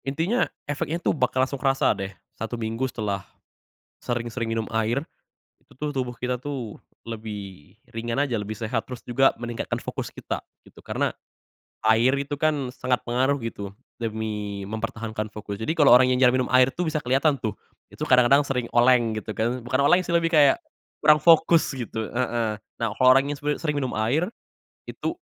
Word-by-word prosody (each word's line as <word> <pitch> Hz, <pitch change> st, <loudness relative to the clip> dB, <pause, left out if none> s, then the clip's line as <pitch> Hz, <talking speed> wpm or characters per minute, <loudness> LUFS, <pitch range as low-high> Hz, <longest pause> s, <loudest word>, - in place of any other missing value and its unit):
Intinya 165 Hz, -, 0 dB, 0.2 s
efeknya 145 Hz, +3 st, -2 dB
tuh 175 Hz, -, 0 dB
bakal 130 Hz, -2 st, +1 dB
langsung 135 Hz, 0 st, -6 dB
kerasa 135 Hz, -1 st, +3 dB
deh, 95 Hz, 0 st, -5 dB, 0.2 s
1 115 Hz, +2 st, -5 dB
minggu 115 Hz, +3 st, -2 dB
setelah, 105 Hz, -5 st, -3 dB, 0.8 s
sering-sering 120 Hz, 0 st, -3 dB
minum 115 Hz, -1 st, -2 dB
air. 110 Hz, +4 st, 0 dB, 0.6 s
Itu -, -, -22 dB, 0.2 s
tubuh 125 Hz, -2 st, -1 dB
kita 125 Hz, +1 st, -2 dB
tuh 125 Hz, -4 st, -6 dB, 0.3 s
lebih 105 Hz, -7 st, -7 dB, 0.2 s
ringan 115 Hz, +3 st, -3 dB
aja, 135 Hz, -5 st, 0 dB
lebih 105 Hz, 0 st, -4 dB
sehat, 110 Hz, +1 st, -2 dB
terus 125 Hz, -2 st, -8 dB
juga 135 Hz, +3 st, +3 dB
meningkatkan 120 Hz, -1 st, -3 dB
fokus -, -, -5 dB
kita -, -, -5 dB, 0.2 s
gitu, -, -, -18 dB
karena, -, -, -1 dB, 0.7 s
air 115 Hz, +4 st, +4 dB
itu 140 Hz, +1 st, -3 dB
kan 145 Hz, -4 st, 0 dB
sangat 125 Hz, 0 st, -1 dB
pengaruh 130 Hz, +3 st, +1 dB
gitu 100 Hz, -3 st, -6 dB, 0.2 s
demi 105 Hz, -3 st, -4 dB
mempertahankan 110 Hz, -1 st, -4 dB
fokus, 105 Hz, -1 st, -6 dB
jadi 110 Hz, +8 st, -1 dB
kalo 150 Hz, -4 st, +5 dB
orang 125 Hz, +1 st, +7 dB
yang -, -, 0 dB
jarang 125 Hz, 0 st, +5 dB
minum 130 Hz, -, -1 dB
air 130 Hz, 0 st, +6 dB
tuh 175 Hz, +5 st, -3 dB
bisa 155 Hz, -1 st, -1 dB
keliatan 135 Hz, +4 st, +2 dB
tuh. 110 Hz, -, -3 dB, 0.3 s
Itu -, -, -5 dB
kadang 125 Hz, -2 st, +5 dB
kadang 140 Hz, +1 st, +6 dB
sering 125 Hz, -3 st, -2 dB
oleng 120 Hz, -2 st, +4 dB
gitu 110 Hz, 0 st, -6 dB
kan, 120 Hz, +3 st, 0 dB
bukan 130 Hz, +2 st, +1 dB
oleng 180 Hz, -, +7 dB
sih 170 Hz, -, -1 dB
lebih 165 Hz, -1 st, +2 dB
kayak, 155 Hz, -, +5 dB, 0.4 s
kurang 150 Hz, 0 st, +7 dB
fokus 165 Hz, 0 st, +4 dB
gitu, 115 Hz, -3 st, -4 dB
heeh, 120 Hz, -3 st, -1 dB, 0.2 s
nah 115 Hz, -, 0 dB
kalo 130 Hz, -, +4 dB
orang 135 Hz, -, 0 dB
yang -, -, -10 dB
sebe 145 Hz, +1 st, -1 dB
sering 150 Hz, -3 st, -1 dB
minum 130 Hz, -, -1 dB
air, 145 Hz, -, +1 dB, 0.6 s
itu, -, -, -3 dB
125 Hz, 175 wpm, -25 LUFS, 110-140 Hz, 0.8 s, orang